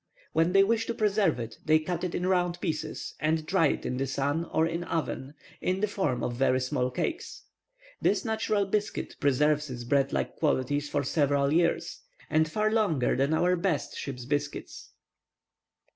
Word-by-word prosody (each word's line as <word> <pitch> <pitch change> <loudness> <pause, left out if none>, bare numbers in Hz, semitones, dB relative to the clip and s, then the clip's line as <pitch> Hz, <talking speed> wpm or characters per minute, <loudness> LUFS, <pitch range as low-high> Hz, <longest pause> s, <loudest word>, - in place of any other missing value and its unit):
When 165 +2 +2
they 195 0 +7
wish 230 +2 +1
to 235 - -2
preserve 205 - +2
it, 115 -1 -6
they 155 0 +5
cut 170 +2 -3
it 180 - -2
in 180 - -1
round 180 -2 +1
pieces, 160 -4 -3
and 155 0 0
dry 170 -1 +3
it - - -2
in 125 - -2
the 135 +1 -1
sun 145 +5 -1
or 160 - +1
in 165 +1 -2
an - - -5
oven, 150 -3 -3 0.3
in 185 +1 0
the 210 - +2
form 155 - -1
of 120 - -1
very 130 0 +2
small 125 0 -1
cakes. 325 - -4 0.6
This - - +2
natural 220 -2 0
biscuit 210 +2 -2
preserves 150 +2 +2
its 120 -2 -6
bread 135 +2 +2
like - - -2
qualities 145 -1 0
for 145 -1 0
several 140 -2 +2
years, 170 +1 +1 0.3
and 155 0 +3
far 215 +5 +1
longer 200 - +2
than 135 +3 +1
our 180 +2 +3
best 170 -4 -1
ship's 125 -3 -6
biscuits." 145 +1 -4
155 Hz, 180 wpm, -28 LUFS, 140-185 Hz, 0.6 s, they